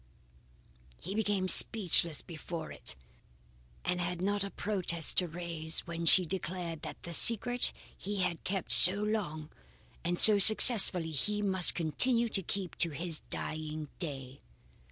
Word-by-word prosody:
He 185 - -9
became 205 -3 -3
speechless 175 -6 +1
before 165 0 -10
it 65 - -4 0.9
and 180 0 -3
had 175 0 -6
not 200 +2 -3
a 200 - -7
protest 180 -6 -3
to 180 - 0
raise 165 -1 -5
when 170 -1 -8
she 180 +2 +4
declared 175 -2 -6
that - - -11
the 170 - -10
secret 240 - +5 0.2
he 200 0 -6
had 180 -2 -5
kept 195 -2 -5
so 185 - +8
long 205 -8 -6 0.5
and 175 +1 -3
so 210 +1 +7
successfully 200 -5 +5
he 210 +8 -2
must 190 -3 +1
continue 230 +9 0
to 195 - -1
keep 185 0 -6
to 170 - +4
his 165 +1 -3
dying 155 -1 -7
day. 135 -6 -5
180 Hz, 140 wpm, -29 LUFS, 165-200 Hz, 0.9 s, so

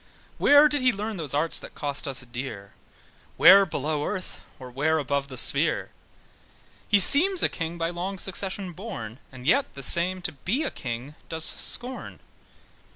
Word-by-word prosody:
Where 290 +1 +6
did 290 -2 -1
he 255 0 +4
learn 210 0 -5
those 150 -4 -4
arts 160 +3 +2
that - - -10
cost 145 -1 -2
us 135 -2 -3
dear? 120 -5 -8 0.6
Where 195 0 +8
below 150 -1 -2
earth, 185 +2 -5 0.2
or 130 -1 -11
where 155 +5 0
above 140 -1 -2
the 130 -2 -9
sphere? - - +1 1.0
He 205 - +4
seems 340 - +3
a - - +5
king 165 +1 -5
by 165 0 -2
long 185 +3 -5
succession 190 0 0
born, 140 - -8
And 130 -1 -12
yet 275 - +1
the 135 - -8
same 180 +6 +1
to - - -2
be 190 - -2
a 290 - -3
king 125 +3 -6 0.2
does 160 -1 0
scorn. 250 +2 -1
165 Hz, 165 wpm, -25 LUFS, 140-200 Hz, 1.0 s, Where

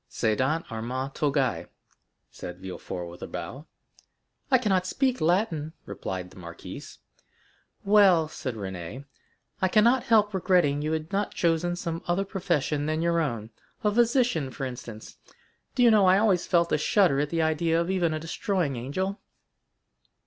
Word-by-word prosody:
"Cedant 130 +9 0
arma 125 +4 -3
togæ," 135 - 0 0.6
said 90 0 -8
Villefort 90 -1 -6
with 85 +1 -11
a - - -5
bow. 140 +6 -7 0.8
"I 260 - +6
cannot 190 -6 +1
speak 260 +4 0
Latin," 160 -3 +1
responded 95 -2 -5
the - - -16
marquise. 85 -1 -9 0.9
"Well," 195 -6 +5
said 130 -5 -5
Renée, 95 +5 -6 0.6
"I 190 - +4
cannot 235 +6 +4
help 215 -2 +4
regretting 175 -6 +2
you 155 +1 -1
had 160 +1 -3
not 205 +1 -1
chosen 170 +1 +1
some 165 -1 -4
other 180 +3 +1
profession 170 -7 -1
than 155 +1 0
your 170 0 +2
own—a 115 - -3
physician, 235 - +2
for 135 +1 -5
instance. 120 -3 -8 0.6
Do 250 - +3
you 235 - +7
know 205 -3 +5
I 185 +1 +6
always 200 -4 +2
felt 170 -1 +2
a - - +2
shudder 170 -3 +3
at 145 0 0
the 165 0 0
idea 160 +1 +1
of 170 +2 -1
even 175 -4 +1
a 155 - -2
destroying 165 -3 -2
angel?" 185 - -3
160 Hz, 150 wpm, -27 LUFS, 130-190 Hz, 0.9 s, you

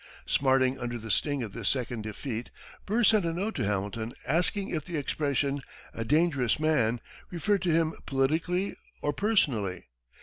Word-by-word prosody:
Smarting 130 -1 +3
under 120 -1 -3
the 115 -1 -4
sting 145 +1 +1
of 110 - -5
this 115 -4 0
second 120 -3 -1
defeat, 110 +2 -5 0.4
Burr 225 +4 +2
sent 215 -2 +5
a 165 - 0
note 200 +6 -1
to 120 - -1
Hamilton 105 +3 -2
asking 180 - +1
if 155 -3 -2
the 170 0 -4
expression, 140 -1 0 0.3
"a 115 - -3
dangerous 145 -2 +2
man," 125 -7 +2 0.3
referred 195 +3 +1
to 175 - +1
him 160 0 +2
politically 160 +8 +1 0.3
or 145 - +1
personally. 125 - +1
140 Hz, 160 wpm, -29 LUFS, 120-170 Hz, 0.4 s, sent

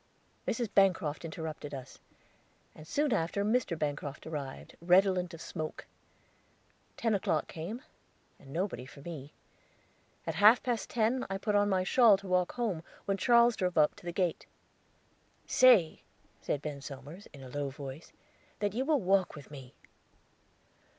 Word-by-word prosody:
Mrs. 235 0 0
Bancroft 180 -6 +2
interrupted 155 -3 -6
us, 130 -1 -10 0.7
and 155 - -13
soon 290 - +1
after 175 +5 0
Mr. 215 -6 +1
Bancroft 145 -1 -4
arrived, 145 -4 -6
redolent 180 0 +3
of 165 - -9
smoke. 155 0 -6 1.1
Ten 225 -2 +1
o'clock 200 - 0
came, 190 +10 -6 0.6
and 135 - -14
nobody 175 -5 -3
for 145 0 -13
me. 150 -3 -8 0.9
At 165 - -2
half 210 +8 +6
past 240 -3 -2
ten 240 +3 +1
I 195 - -2
put 210 +1 -2
on 205 0 +3
my 185 -2 +2
shawl 220 0 +6
to 195 0 -11
walk 180 -1 +1
home, 220 -9 -2 0.2
when 195 0 0
Charles 235 +2 +5
drove 180 -4 -1
up 150 -1 +4
to - - -15
the - - -1
gate. 175 -2 -1 1.0
"Say," 220 -11 +5 0.4
said 145 - -2
Ben 145 -2 -5
Somers, 145 +8 -9
in 140 -2 -12
a 130 - -9
low 145 +1 -3
voice, 135 +2 -9 0.5
"that 205 -1 -1
you 250 +4 0
will 295 -3 +2
walk 190 0 +2
with 145 -2 -12
me." 135 -3 -11
180 Hz, 150 wpm, -31 LUFS, 150-205 Hz, 1.1 s, half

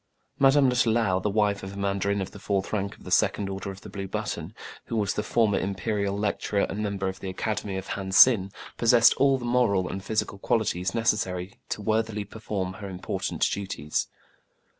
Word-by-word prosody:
Madame 135 0 +5
Lutalou, 115 -6 +2
the 105 - 0
wife 105 -1 +1
of 95 +1 -7
a - - -9
mandarin 100 0 0
of - - -8
the 100 - -11
fourth 100 0 -2
rank 100 -1 -2
of - - -18
the 90 - -9
second 100 +1 +2
order 95 0 -5
of 95 0 -8
the - - -10
blue 100 -1 -5
button, - - -4 0.3
who - - -4
was 105 -3 +1
the - - -1
former 105 -1 +2
imperial 100 +1 -2
lecturer 100 0 0
and 100 - -2
member 100 -2 -2
of 95 0 -4
the 95 - -5
Acad 105 +3 -2
emy 100 -2 -5
of 95 - -5
Han 95 -1 -4
Sin, 95 -1 +7 0.3
possessed 115 0 +6
all 135 0 +4
the 120 - -6
moral 120 -7 +2
and 95 +1 -5
physical 105 -1 -2
qualities 95 -4 0
necessary 95 -5 0 0.2
to 105 - -4
worthily 110 0 0
perform 100 -2 -4
her 100 +1 -8
important 90 -1 -2
duties. 85 -7 -2
100 Hz, 195 wpm, -26 LUFS, 95-110 Hz, 0.3 s, Sin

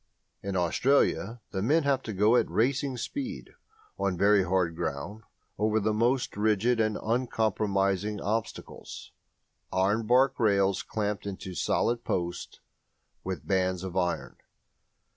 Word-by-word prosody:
In 100 -1 -4
Australia 115 +4 +1
the 95 - -2
men 150 +10 +3
have 140 -2 +1
to - - -2
go 105 +5 +4
at - - +2
racing 130 +3 0
speed, 260 - -5 0.5
on 95 -2 0
very 100 +2 +5
hard 90 -2 0
ground, 85 +8 -4 0.4
over 110 +1 +2
the 110 +1 0
most 120 +4 +1
rigid 110 +3 +2
and 110 -1 +1
uncompromising 105 -4 0
obstacles 110 +3 -5 0.6
ironbark 110 +7 +2
rails 100 -4 +2
clamped 105 -1 -3
into 95 -1 -6
solid 120 +6 0
posts 85 -1 -3 0.6
with 95 -1 -5
bands 95 -1 0
of 95 -2 -6
iron. 90 -2 -1
105 Hz, 125 wpm, -28 LUFS, 95-115 Hz, 0.6 s, very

